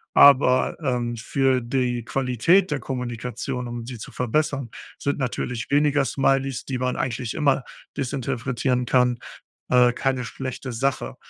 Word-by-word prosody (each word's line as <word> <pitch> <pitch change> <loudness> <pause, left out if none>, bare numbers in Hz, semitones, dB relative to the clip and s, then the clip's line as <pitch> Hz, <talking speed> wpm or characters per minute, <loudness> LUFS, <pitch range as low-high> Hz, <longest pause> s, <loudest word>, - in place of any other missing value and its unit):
Aber, 130 -2 +6
ähm, 120 -4 -1
für 130 +2 +1
die 120 0 -1
Qualität 135 - +2
der 145 - 0
Kommunikation, 125 0 -4
um 120 -1 -6
sie 120 -1 -7
zu - - -8
verbessern, 135 +1 -1 0.3
sind 140 +1 -2
natürlich 125 -1 -3
weniger 145 0 +3
Smileys, 135 -1 0
die 130 -2 -3
man 125 0 -1
eigentlich 120 -2 -3
immer 140 -3 +2 0.3
desinterpretieren 125 -1 -1
kann, 125 -1 +2 0.5
äh, 125 -1 +5
keine 130 -1 -1
schlechte 130 +1 -6
Sache. 115 - -1
125 Hz, 135 wpm, -24 LUFS, 120-135 Hz, 0.5 s, Aber